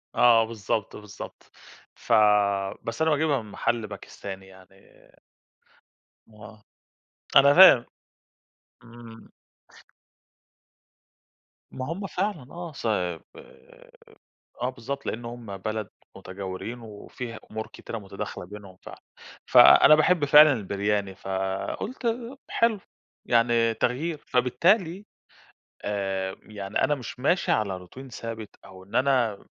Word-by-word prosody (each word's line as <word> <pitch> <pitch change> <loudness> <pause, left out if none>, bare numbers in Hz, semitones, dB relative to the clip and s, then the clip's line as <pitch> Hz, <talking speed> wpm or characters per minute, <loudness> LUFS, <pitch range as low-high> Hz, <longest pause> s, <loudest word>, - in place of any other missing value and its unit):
آه 115 -2 +5
بالضبط، 110 -1 -3
بالضبط، 105 -1 -11 0.4
ف - - -2 0.7
بس 115 +5 -5
أنا 160 0 +3
باجيبها 150 -4 +1
من 105 - -13
محل 115 +1 -1
باكستاني 95 -1 -9
يعني 95 0 -18 1.6
آه، 105 0 -14 0.7
أنا 140 +1 +7
فاهم، 190 +3 +9 1.0
إمم. 120 -1 -14 2.4
ما 130 -1 -5
هُم 195 +3 -5
فعلًا 180 -7 -3
آه، 170 -1 -7
صب 90 - -2 1.4
آه 125 - 0
بالضبط، 130 +2 -6
لإن 120 +1 -4
هُم 115 -4 -8
بلد 110 +1 -4 0.3
مُتجاورين، 95 +5 -7
وفي 115 +1 -9
أُمور 110 0 -5
كتيرة 115 - -8
متداخلة 100 -3 -7
بينهم 100 -1 -12
فعلًا، - - -12 0.4
فأنا 155 - +8
باحب 155 0 +2
فعلًا 145 -7 +6
الBiryani 100 0 -1
فقُلت 95 - -4
ب 235 +3 -3
حلو 230 -3 +1 0.5
يعني 115 -1 +2
تغيير، 140 +9 -2
فبالتالي 170 - +1 0.8
آآ 95 -2 -3
يعني 100 -1 -3
أنا 150 - +2
مش 125 -2 -9
ماشي 175 +7 +1
على 100 -4 -1
Routine 130 +8 -12
ثابت، 115 -3 -7
أو 95 -1 -14
إن 100 - -18
أنا 125 -6 +2
م - - -21
115 Hz, 110 wpm, -25 LUFS, 100-140 Hz, 2.4 s, فاهم